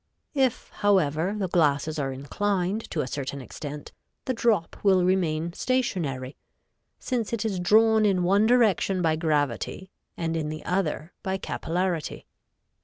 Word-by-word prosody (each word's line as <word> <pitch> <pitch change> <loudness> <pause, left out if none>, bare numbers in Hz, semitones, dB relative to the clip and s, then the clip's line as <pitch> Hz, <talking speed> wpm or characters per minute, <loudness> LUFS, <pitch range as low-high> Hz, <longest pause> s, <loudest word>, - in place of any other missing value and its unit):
If, 265 -4 0
however, 185 -2 +1
the 195 -3 -1
glasses 155 -2 +1
are 135 -2 -1
inclined 190 +9 -2
to 155 - -1
a 130 - -3
certain 140 +1 -4
extent, 145 +2 -8 0.3
the 260 - 0
drop 225 -8 +1
will 190 -3 +4
remain 170 -3 +1
stationary, 170 - -1 0.6
since 235 -4 -2
it 230 -1 -1
is 200 -4 -1
drawn 220 +4 +5
in 190 -4 +2
one 200 +4 +4
direction 210 -6 +3
by 160 -1 +3
gravity 155 - -1 0.3
and 165 -1 -2
in 155 -2 -2
the 155 0 -7
other 175 -2 -1
by 190 0 -2
capillarity. 175 -2 -2
180 Hz, 140 wpm, -26 LUFS, 155-205 Hz, 0.6 s, drawn